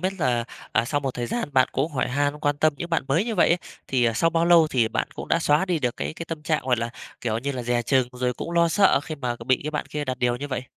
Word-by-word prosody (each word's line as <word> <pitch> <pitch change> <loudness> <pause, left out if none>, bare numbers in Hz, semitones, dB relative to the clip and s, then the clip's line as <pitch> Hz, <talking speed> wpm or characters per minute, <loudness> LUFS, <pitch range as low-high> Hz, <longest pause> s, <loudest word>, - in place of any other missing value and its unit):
biết 185 +1 0
là, 120 -6 +1 0.3
à, 110 - +3
sau 145 +4 -1
một 135 -3 -3
thời 120 -1 -3
gian 235 - -2
bạn 130 -1 +4
cũng 150 +4 -1
hỏi 130 - 0
han, 145 +3 0
quan 145 0 +1
tâm 155 0 +3
những 170 0 -6
bạn 165 - +1
mới 165 +10 +2
như 230 - -2
vậy - - +4
ấy, 175 - +3 0.3
thì, 125 -2 +1
ờ, 115 - +3
sau 165 +9 +2
bao 165 0 +2
lâu 170 -2 +6
thì 120 -5 +2
bạn - - -2
cũng - - -7
đã 165 - +3
xóa 150 +2 +3
đi 180 -4 0
được 125 -4 -1
cái - - -3
cái 165 - -6
tâm 160 -2 -5
trạng, 155 0 0
gọi 125 -2 +2
là, 115 0 -3 0.3
kiểu 110 -2 -1
như 140 +4 -3
là, 125 -2 -4
dè 120 0 0
chừng 130 0 +2
rồi 125 0 -1
cũng - - -6
lo 170 0 +3
sợ 195 -3 +4
khi 155 +1 -6
mà, 125 -4 -3
kiểu, 115 - -10
bị 130 0 +2
cái 150 - -2
bạn 150 - -3
kia 150 -1 -4
đặt 130 -2 -3
điều 120 -1 +1
như 145 +3 -6
vậy? 130 - -3
140 Hz, 320 wpm, -24 LUFS, 125-165 Hz, 0.3 s, lâu